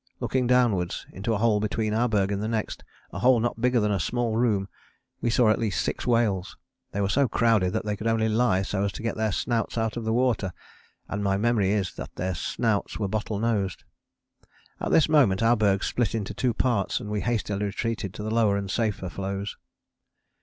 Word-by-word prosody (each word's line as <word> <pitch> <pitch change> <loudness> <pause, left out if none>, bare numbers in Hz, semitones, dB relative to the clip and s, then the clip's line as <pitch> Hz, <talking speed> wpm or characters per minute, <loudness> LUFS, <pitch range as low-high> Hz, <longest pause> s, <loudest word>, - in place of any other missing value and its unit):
Looking 130 -2 0
downwards 120 -8 +2
into 100 +5 -3
a 110 - +1
hole 110 -1 +2
between 110 +1 -1
our 120 +3 +2
berg 100 -2 +1
and 100 0 -1
the 110 - -2
next, 110 -1 -3 0.3
a - - -4
hole 125 -1 +5
not 115 0 -2
bigger 125 0 +3
than 105 -1 +1
a 100 - 0
small 115 +7 -1
room, 110 -5 +1 0.5
we 120 - +1
saw 115 -1 +4
at - - +1
least 110 -4 -1
six - - -3
whales. 110 -6 +1 0.3
They 100 - -2
were 100 - +1
so 135 +7 +2
crowded 110 -7 +2
that - - -2
they 105 -1 -1
could 110 +3 -4
only 115 -1 +2
lie 110 -4 +2
so 100 0 -1
as 100 - 0
to - - -7
get 115 - -1
their 110 -1 0
snouts 115 +3 -1
out 110 0 -1
of 120 - -3
the 110 - -1
water, 115 -6 +1 0.5
and 100 +1 -3
my 95 -1 +1
memory 105 -2 +2
is 100 -3 0
that - - -7
their 95 +1 -2
snouts 105 +4 -1
were 105 - -1
bottle 105 +1 -2
nosed. 105 -4 -1 1.0
At - - -2
this 160 - +4
moment 125 -11 +4
our 115 +1 +5
berg 100 -3 +2
split 120 -3 0
into 105 -2 -3
two 120 +2 0
parts 120 -7 +1
and 120 - -7
we 105 -1 -1
hastily 105 -4 -1
retreated 105 0 -3
to 105 - -6
the 110 - -3
lower 110 -3 +3
and 100 -1 -3
safer 105 -5 -1
floes. 100 +3 -4
110 Hz, 215 wpm, -26 LUFS, 100-115 Hz, 1.0 s, hole